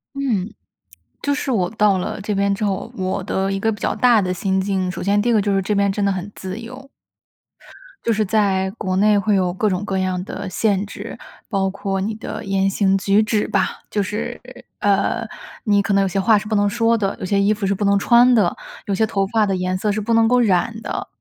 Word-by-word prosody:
嗯， 230 Hz, -8 st, -1 dB, 0.7 s
就 285 Hz, -, 0 dB
是 280 Hz, -2 st, -2 dB
我 185 Hz, -6 st, +1 dB
到 210 Hz, -3 st, +3 dB
了 185 Hz, -, -4 dB
这 210 Hz, +1 st, -2 dB
边 200 Hz, 0 st, +1 dB
之 210 Hz, +2 st, -4 dB
后， 205 Hz, +3 st, -2 dB
我 185 Hz, 0 st, -2 dB
的 195 Hz, 0 st, -1 dB
一 195 Hz, -, -2 dB
个 225 Hz, +2 st, +1 dB
比 210 Hz, -, -6 dB
较 -, -, 0 dB
大 240 Hz, -4 st, +4 dB
的 180 Hz, -1 st, -1 dB
心 190 Hz, +1 st, 0 dB
境， 190 Hz, -2 st, -1 dB
首 -, -, -7 dB
先 205 Hz, +1 st, +2 dB
第 240 Hz, -, 0 dB
一 -, -, +3 dB
个 210 Hz, -, +3 dB
就 200 Hz, 0 st, 0 dB
是 195 Hz, -, +2 dB
这 210 Hz, +3 st, -1 dB
边 200 Hz, 0 st, +2 dB
真 205 Hz, +1 st, -2 dB
的 200 Hz, -, +2 dB
很 190 Hz, +2 st, -4 dB
自 190 Hz, +3 st, -6 dB
由。 255 Hz, +4 st, -10 dB, 1.1 s
就 230 Hz, -, +1 dB
是 215 Hz, 0 st, +1 dB
在 190 Hz, -2 st, +1 dB
国 185 Hz, -3 st, -2 dB
内 205 Hz, +1 st, +4 dB
会 205 Hz, +1 st, +1 dB
有 180 Hz, -2 st, +1 dB
各 210 Hz, +2 st, 0 dB
种 185 Hz, +2 st, -2 dB
各 195 Hz, -2 st, -2 dB
样 185 Hz, -1 st, -1 dB
的 200 Hz, -1 st, -6 dB
限 205 Hz, 0 st, 0 dB
制， -, -, -8 dB, 0.3 s
包 195 Hz, -3 st, 0 dB
括 195 Hz, 0 st, -3 dB
你 215 Hz, +3 st, -2 dB
的 220 Hz, 0 st, -7 dB
言 195 Hz, 0 st, +1 dB
行 195 Hz, 0 st, +2 dB
举 200 Hz, +2 st, +3 dB
止 215 Hz, -1 st, 0 dB
吧。 195 Hz, -, -1 dB
就 205 Hz, -, 0 dB
是， 210 Hz, +2 st, -4 dB, 0.4 s
呃， 205 Hz, +3 st, +1 dB, 0.4 s
你 205 Hz, -1 st, +3 dB
可 200 Hz, 0 st, -1 dB
能 195 Hz, -, +4 dB
有 195 Hz, -, +1 dB
些 195 Hz, +2 st, -1 dB
话 220 Hz, +2 st, +4 dB
是 210 Hz, -, -4 dB
不 215 Hz, -, -1 dB
能 205 Hz, 0 st, +3 dB
说 230 Hz, +1 st, +2 dB
的， 195 Hz, -2 st, -2 dB
有 -, -, -4 dB
些 200 Hz, +1 st, +1 dB
衣 205 Hz, +2 st, +3 dB
服 205 Hz, -1 st, -3 dB
是 200 Hz, -, +1 dB
不 205 Hz, -, -3 dB
能 200 Hz, 0 st, +4 dB
穿 240 Hz, +3 st, +5 dB
的， 205 Hz, -7 st, +3 dB, 0.3 s
有 200 Hz, -, -1 dB
些 220 Hz, -, +2 dB
头 195 Hz, -2 st, 0 dB
发 220 Hz, 0 st, +2 dB
的 195 Hz, -1 st, 0 dB
颜 185 Hz, 0 st, -1 dB
色 210 Hz, +2 st, 0 dB
是 215 Hz, -, -1 dB
不 230 Hz, +2 st, -1 dB
能 225 Hz, 0 st, +4 dB
够 250 Hz, +1 st, +3 dB
染 220 Hz, +1 st, +1 dB
的。 -, -, -4 dB
200 Hz, 265 characters per minute, -20 LUFS, 190-215 Hz, 1.1 s, 穿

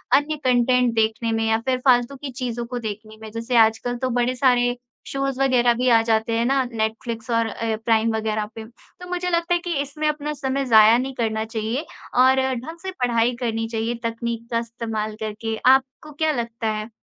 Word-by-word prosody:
अन्य 295 Hz, +2 st, +1 dB
कॉन्टेंट 250 Hz, -1 st, +3 dB
देखने 225 Hz, +1 st, +1 dB
में 225 Hz, 0 st, 0 dB
या 220 Hz, -, +2 dB
फिर 255 Hz, -, +2 dB
फालतू 245 Hz, +2 st, +4 dB
की 275 Hz, 0 st, -7 dB
चीज़ों 245 Hz, -2 st, -4 dB
को 245 Hz, +1 st, -5 dB
देखने 215 Hz, 0 st, -7 dB
में, 220 Hz, -1 st, -9 dB
जैसे 230 Hz, +2 st, -1 dB
आजकल 225 Hz, +2 st, +3 dB
तो 255 Hz, +1 st, -2 dB
बड़े 250 Hz, +1 st, +1 dB
सारे 245 Hz, -2 st, +2 dB, 0.3 s
शोज़ 275 Hz, -1 st, -2 dB
वगैरह 245 Hz, -3 st, +4 dB
भी 255 Hz, -, +1 dB
आ 225 Hz, -, +6 dB
जाते 225 Hz, 0 st, +1 dB
हैं 235 Hz, -, +1 dB
ना, 270 Hz, +1 st, +2 dB
नेटफ्लिक्स 225 Hz, +1 st, -3 dB
और 230 Hz, 0 st, +2 dB
अ, 225 Hz, 0 st, -2 dB
प्राइम 225 Hz, 0 st, +2 dB
वगैरह 215 Hz, -1 st, -1 dB
पे। 225 Hz, -, -7 dB, 0.4 s
तो 360 Hz, -, -9 dB
मुझे 360 Hz, 0 st, -2 dB
लगता 340 Hz, 0 st, +1 dB
है 350 Hz, -, +2 dB
कि 345 Hz, -, -1 dB
इसमें 295 Hz, +2 st, -3 dB
अपना 300 Hz, 0 st, -2 dB
समय 275 Hz, -1 st, -2 dB
ज़ाया 220 Hz, -1 st, +7 dB
नहीं 265 Hz, +2 st, -3 dB
करना 220 Hz, -2 st, -1 dB
चाहिए 225 Hz, +6 st, -3 dB, 0.4 s
और 260 Hz, +1 st, +5 dB, 0.2 s
ढंग 315 Hz, +8 st, -7 dB
से 380 Hz, -, -4 dB
पढ़ाई 235 Hz, 0 st, +2 dB
करनी 225 Hz, -2 st, -2 dB
चाहिए 225 Hz, +1 st, -2 dB
तकनीक 230 Hz, 0 st, -4 dB
का 230 Hz, -, +2 dB
इस्तेमाल 225 Hz, -2 st, -4 dB
करके, 220 Hz, +1 st, -3 dB
आपको 265 Hz, +3 st, +3 dB
क्या 310 Hz, +2 st, 0 dB
लगता 230 Hz, -3 st, -3 dB
है? 215 Hz, 0 st, -3 dB
235 Hz, 195 wpm, -22 LUFS, 225-265 Hz, 0.4 s, ज़ाया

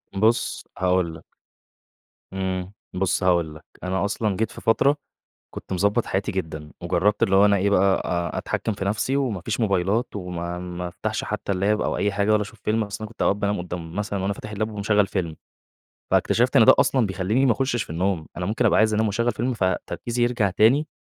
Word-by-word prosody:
بُصّ 110 Hz, +4 st, +1 dB
هاقول 90 Hz, -2 st, +1 dB
لَك -, -, -13 dB, 1.1 s
إمم، 95 Hz, 0 st, -3 dB, 0.2 s
بُصّ 90 Hz, -1 st, 0 dB
هاقول 85 Hz, -4 st, +2 dB
لَك، -, -, -13 dB, 0.2 s
أنا 95 Hz, +2 st, 0 dB
أصلًا 105 Hz, -1 st, -1 dB
جيت 110 Hz, -1 st, -1 dB
في -, -, -10 dB
فترة، 140 Hz, +6 st, +3 dB, 0.6 s
كنت -, -, -7 dB
مضبّط 100 Hz, +5 st, +1 dB
حياتي 95 Hz, +1 st, -1 dB
جدًا، 80 Hz, -5 st, -5 dB
وجرّبت 90 Hz, +4 st, +1 dB
اللي 95 Hz, 0 st, +4 dB
هو 100 Hz, -, +6 dB
أنا 100 Hz, -1 st, +4 dB
إيه 100 Hz, +1 st, +1 dB
بقى 95 Hz, -1 st, +4 dB, 0.4 s
أ -, -, -1 dB
أتحكِّم 110 Hz, -, -2 dB
في 95 Hz, -, -4 dB
نفْسي 110 Hz, +7 st, 0 dB
وما 120 Hz, -10 st, -1 dB
فيش 110 Hz, +6 st, -3 dB
موبايلات 100 Hz, +2 st, +1 dB
وما 90 Hz, -2 st, -4 dB
ما 90 Hz, 0 st, -5 dB
أفتحش -, -, -3 dB
حتّى 100 Hz, -, -3 dB
الLap 100 Hz, +3 st, +1 dB
أو -, -, -1 dB
أي 105 Hz, 0 st, 0 dB
حاجة 100 Hz, +2 st, +1 dB
ولا 105 Hz, 0 st, +3 dB
أشوف 105 Hz, +2 st, -10 dB
فيلم 110 Hz, 0 st, +1 dB
أصلًا 105 Hz, +2 st, -6 dB
كنت 115 Hz, -, -6 dB
أوقات 100 Hz, -, +3 dB
بانام 105 Hz, -1 st, -1 dB
قدّام 85 Hz, -1 st, -6 dB
مثلًا 100 Hz, -2 st, -2 dB
وأنا 100 Hz, +1 st, 0 dB
فاتح 105 Hz, +1 st, -8 dB
الLap 110 Hz, +1 st, -2 dB
ومشغّل 105 Hz, -1 st, +1 dB
فيلم، 85 Hz, -6 st, -3 dB, 0.7 s
فاكتشفت -, -, +2 dB
إن -, -, +8 dB
ده -, -, +8 dB
أصلًا 125 Hz, -5 st, +3 dB
بيخلّيني 100 Hz, +8 st, +1 dB
ما 120 Hz, -, +5 dB
اخُشِش 120 Hz, -2 st, 0 dB
في -, -, -11 dB
النوم، 85 Hz, -1 st, -1 dB
أنا 90 Hz, +1 st, -3 dB
ممكن 115 Hz, +3 st, +1 dB
أبقى -, -, +4 dB
عايز 110 Hz, 0 st, +3 dB
أنام 110 Hz, +1 st, +2 dB
و -, -, 0 dB
أشغّل 115 Hz, +3 st, 0 dB
فيلم 125 Hz, +2 st, -1 dB
فتركيزي 115 Hz, +4 st, -2 dB
يرجع 120 Hz, -5 st, +2 dB
تاني، 125 Hz, +11 st, +4 dB
100 Hz, 205 wpm, -24 LUFS, 90-110 Hz, 1.1 s, إن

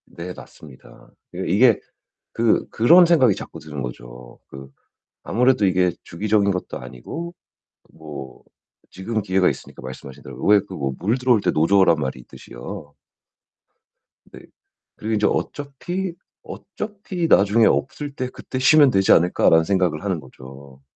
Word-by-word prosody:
네 90 Hz, +2 st, -8 dB
맞습니다. 70 Hz, -6 st, -15 dB, 0.2 s
그게 -, -, -4 dB
이게 115 Hz, +2 st, +4 dB, 0.5 s
그 115 Hz, -1 st, +1 dB
그런 170 Hz, +11 st, +6 dB
생각이 135 Hz, -, +4 dB
자꾸 -, -, -9 dB
드는 75 Hz, -2 st, -8 dB
거죠. -, -, -9 dB
그 70 Hz, 0 st, -11 dB, 0.5 s
아무래도 125 Hz, -1 st, +2 dB
이게 90 Hz, -1 st, +2 dB
주기적인 100 Hz, +2 st, 0 dB
것도 90 Hz, -1 st, -5 dB
아니고 170 Hz, -, -8 dB, 0.6 s
뭐 75 Hz, -4 st, -10 dB, 0.5 s
지금 110 Hz, +3 st, -4 dB
기회가 95 Hz, -1 st, +2 dB
있으니까 -, -, -7 dB
말씀하신 65 Hz, +2 st, -10 dB
대로 -, -, -9 dB
왜 105 Hz, 0 st, +5 dB
그 95 Hz, -, -9 dB
어 70 Hz, -5 st, -3 dB
물 110 Hz, +8 st, 0 dB
들어올 125 Hz, -3 st, +3 dB
때 -, -, +1 dB
노 80 Hz, +1 st, +1 dB
저으란 95 Hz, -3 st, +4 dB
말이 65 Hz, -2 st, -4 dB
있듯이요. 70 Hz, +6 st, -11 dB, 1.3 s
네. -, -, -14 dB, 0.6 s
그리고 110 Hz, +1 st, -4 dB
인제 105 Hz, -1 st, +2 dB
어차피, 170 Hz, +6 st, -4 dB, 0.3 s
어차피 200 Hz, -4 st, -5 dB
'나중에 105 Hz, -2 st, +4 dB
없을 145 Hz, +2 st, -2 dB
때 130 Hz, -2 st, -4 dB
그때 130 Hz, -, -7 dB
쉬면 140 Hz, +1 st, +6 dB
되지 95 Hz, -3 st, +3 dB
않을까.'라는 80 Hz, -1 st, +4 dB
생각을 90 Hz, -3 st, 0 dB
하는 95 Hz, -4 st, -2 dB
거죠. 70 Hz, 0 st, -14 dB
95 Hz, 305 characters per minute, -21 LUFS, 75-125 Hz, 1.3 s, 그런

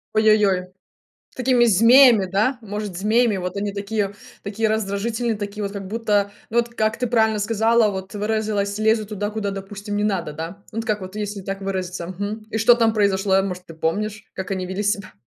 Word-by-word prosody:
Ой-ой-ой, 210 Hz, -4 st, +3 dB, 0.7 s
такими 255 Hz, -1 st, +3 dB
змеями, 230 Hz, 0 st, +6 dB
да, 215 Hz, +8 st, +1 dB
может, 210 Hz, -3 st, -5 dB
змеями, 215 Hz, +2 st, +2 dB
вот 180 Hz, +1 st, -4 dB
они 200 Hz, 0 st, -2 dB
такие, 200 Hz, 0 st, -2 dB, 0.3 s
такие 215 Hz, +2 st, -1 dB
раздражительные, 220 Hz, +2 st, -1 dB
такие 205 Hz, 0 st, -5 dB
вот, 200 Hz, -, -3 dB
как 200 Hz, -2 st, -6 dB
будто, 205 Hz, -1 st, 0 dB, 0.2 s
ну 235 Hz, -, +1 dB
вот, 235 Hz, 0 st, 0 dB
как 215 Hz, 0 st, 0 dB
ты 250 Hz, -, 0 dB
правильно 220 Hz, -2 st, +2 dB
сказала, 225 Hz, +1 st, +2 dB
вот, 190 Hz, +1 st, -6 dB
выразилась, 210 Hz, -1 st, -1 dB
лезут 220 Hz, -1 st, +2 dB
туда, 205 Hz, 0 st, -3 dB
куда, 215 Hz, -2 st, -3 dB
допустим, 200 Hz, +1 st, -6 dB
не 205 Hz, -, 0 dB
надо, 190 Hz, -7 st, -1 dB
да? 165 Hz, +6 st, -7 dB
Ну 225 Hz, -, -5 dB
вот 225 Hz, -, -2 dB
как 210 Hz, -2 st, 0 dB
вот, 185 Hz, +2 st, -8 dB
если 205 Hz, -1 st, -4 dB
так 195 Hz, +1 st, -5 dB
выразиться. 185 Hz, -3 st, -4 dB
Мгм. 205 Hz, +4 st, -5 dB
И 220 Hz, -, -1 dB
что 225 Hz, +2 st, +6 dB
там 230 Hz, -2 st, +2 dB
произошло, 195 Hz, -2 st, +2 dB
может, 180 Hz, -2 st, -5 dB
ты 165 Hz, -, -11 dB
помнишь, 205 Hz, +6 st, -2 dB
как 190 Hz, 0 st, -5 dB
они 185 Hz, -1 st, -2 dB
вели 190 Hz, +3 st, -3 dB
себя? 205 Hz, -2 st, -1 dB
205 Hz, 195 wpm, -22 LUFS, 195-220 Hz, 0.7 s, змеями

